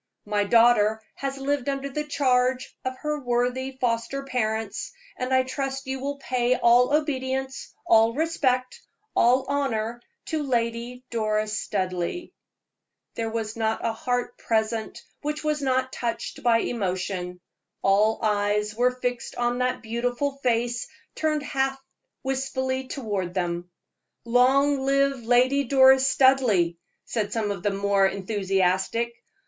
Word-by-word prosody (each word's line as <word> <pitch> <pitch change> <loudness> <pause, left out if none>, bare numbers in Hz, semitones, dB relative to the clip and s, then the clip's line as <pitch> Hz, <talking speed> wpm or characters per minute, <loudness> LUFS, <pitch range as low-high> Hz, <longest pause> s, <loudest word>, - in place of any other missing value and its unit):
My 205 -1 0
daughter 220 -1 +4
has 275 0 -4
lived 280 0 -1
under 275 0 -2
the 300 +2 -3
charge 255 -3 +1
of 260 0 -3
her 300 0 -1
worthy 250 +1 -1
foster 240 +3 -1
parents, 220 -5 -2 0.2
and 255 +1 -3
I 260 0 +4
trust 270 +1 -4
you 265 0 -3
will 280 +2 -3
pay 255 -2 +1
all 245 +2 +4
obedience, 265 -3 -2
all 225 +1 +4
respect, 265 -5 0 0.3
all 255 +3 +4
honor 240 -5 -1 0.2
to 320 -6 -2
Lady 240 -1 -2
Doris 215 -2 0
Studleigh." 185 - -2 0.8
There 225 -1 -3
was 220 -1 -3
not 220 -1 -1
a 230 - +1
heart 245 +2 -2
present 220 0 -1 0.2
which 300 +1 -3
was 300 -1 0
not 260 -1 0
touched 235 -1 -4
by 230 -2 +3
emotion. 185 -4 -3 0.4
All 210 +3 +3
eyes 210 0 +1
were 245 +3 +3
fixed 250 -1 -4
on 240 0 0
that 250 0 -1
beautiful 245 +5 -2
face 240 -1 0 0.3
turned 305 -2 0
half 270 -2 -1 0.4
wistfully 265 0 -2
toward 200 -10 -3
them. 175 -1 -2 0.6
"Long 265 +4 +4
live 275 0 +2
Lady 255 +4 +4
Doris 265 0 +6
Studleigh!" 255 -11 +4 0.3
said 210 -3 -2
some 215 -2 -1
of 195 -3 -5
the 205 - +1
more 200 0 +2
enthusiastic. 195 +3 0
245 Hz, 130 wpm, -25 LUFS, 220-265 Hz, 0.8 s, Doris